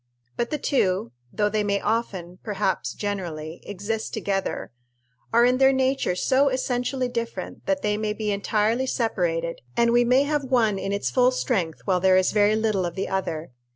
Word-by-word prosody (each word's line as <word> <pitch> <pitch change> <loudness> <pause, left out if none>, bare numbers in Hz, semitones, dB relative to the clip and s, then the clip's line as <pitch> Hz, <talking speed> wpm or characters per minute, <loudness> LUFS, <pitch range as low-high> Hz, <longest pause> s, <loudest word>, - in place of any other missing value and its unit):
But 235 - -1
the 300 - -1
two, 185 - 0 0.2
though 210 - +1
they 210 0 0
may 200 -1 +1
often 190 -6 -2
perhaps 205 -3 -1
generally 170 -6 -4
exist 205 +3 -3
together, 195 -8 -2 0.6
are 235 +1 +5
in 250 +1 +3
their 270 0 +6
nature 265 -7 +1
so 270 +8 +3
essentially 255 0 -1
different 235 -1 -5
that 290 -1 0
they 210 0 +1
may 215 0 -1
be 210 -1 -2
entirely 215 +5 +1
separated, 170 -9 -1 0.2
and 235 0 +4
we 240 +1 +5
may 250 +3 +4
have 295 0 0
one 230 -6 +2
in 195 - -3
its 200 0 -1
full 250 -1 +4
strength 195 - -1
while 185 -2 +2
there 185 0 +4
is 185 - +3
very 210 0 +3
little 215 -3 +1
of 170 - -7
the 195 - -2
other. 170 -5 -3
215 Hz, 180 wpm, -24 LUFS, 190-250 Hz, 0.6 s, their